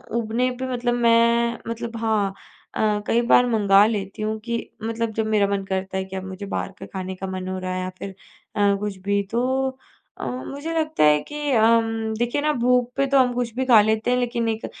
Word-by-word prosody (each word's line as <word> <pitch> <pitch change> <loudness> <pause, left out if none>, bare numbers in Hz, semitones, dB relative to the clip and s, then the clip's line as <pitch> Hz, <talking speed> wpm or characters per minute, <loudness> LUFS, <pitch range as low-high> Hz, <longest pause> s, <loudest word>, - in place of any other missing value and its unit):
ऊबने 235 +2 0
पे 260 - -2
मतलब 240 0 0
मैं, 235 0 +3
मतलब 230 0 -5
हाँ 215 -4 0 0.4
अ, 210 -1 +1
कई 235 - +3
बार 245 - +6
मँगा 205 -2 +5
लेती 205 -2 -3
हूँ 215 +1 -1
कि 235 +1 -3 0.3
मतलब 230 0 -2
जब 220 0 -1
मेरा 210 -2 +2
मन 200 -1 -1
करता 190 0 -3
है 190 - -1
कि 190 0 -9
अब 190 - -4
मुझे 190 +1 -7
बाहर 195 - -3
का - - -7
खाने 190 -1 -6
का 190 +1 -6
मन 185 0 -5
हो 185 0 -3
रहा 185 0 -4
है 185 - -2
या 185 - -3
फिर 195 - -5 0.5
अ, 205 -1 +3
कुछ 205 -2 -4
भी। 200 0 +2
तो 260 +3 +1 0.5
अ, - - -4
मुझे 280 +5 -5
लगता 310 - 0
है 150 0 +5
कि 295 -1 -4
अम, 225 -1 +2
देखिए 240 +4 0
ना, 300 +1 +2
भूख 250 -1 +2
पे 275 - +3
तो 275 0 +3
हम 250 -1 +3
कुछ 240 -2 -2
भी 260 0 -1
खा 230 -5 +7
लेते 220 +3 +1
हैं, 250 - +3
लेकिन 240 -1 -1
एक 220 0 -3
225 Hz, 225 wpm, -23 LUFS, 200-245 Hz, 0.5 s, खा